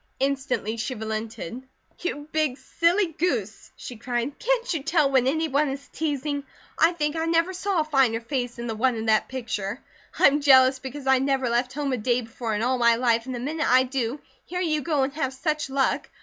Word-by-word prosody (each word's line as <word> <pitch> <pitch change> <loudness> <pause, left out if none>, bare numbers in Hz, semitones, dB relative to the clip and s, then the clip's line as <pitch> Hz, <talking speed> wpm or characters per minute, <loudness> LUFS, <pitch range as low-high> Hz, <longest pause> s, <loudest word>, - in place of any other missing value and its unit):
Instantly 260 -5 -1
she 250 +3 -3
relented. 220 0 -5 0.4
"You 295 -4 -4
big 305 -5 0
silly 340 +3 +1
goose!" 245 - -2
she 240 -3 -9
said. 245 +3 -2
"Can't - - 0
you 320 - -2
tell 300 -2 +2
when 260 -2 +3
any 320 +4 +1
one 290 0 +1
is 275 +1 -6
teasing? 290 -2 -2 0.4
I 330 +2 +5
think 300 -2 -1
I 325 0 -1
never 330 +2 +2
saw 375 -2 0
a - - +1
finer 270 -7 +2
face 245 0 -3
than 235 -1 -6
the 230 - -2
one 245 +3 +1
in 220 0 -4
that 220 -1 +2
picture. 230 -4 -4 0.4
I'm 290 +1 +5
jealous 260 -2 +6
because 265 +1 -7
I 265 -1 +4
never 265 -2 +1
left 245 +2 0
home 285 -1 -2
a - - 0
day 245 +2 +1
before 230 -1 -4
in 210 - -1
all 255 +1 +1
my 235 -1 +5
life, 235 0 +1
and 260 - -4
the - - -4
minute 300 +5 -1
I 255 +1 +6
do, 260 0 -2 0.2
here 360 - -5
you 310 -4 0
go 295 -2 +1
and 270 +1 -2
have 270 -4 -2
such 305 0 -2
luck. 270 0 0
265 Hz, 210 wpm, -25 LUFS, 240-300 Hz, 0.4 s, jealous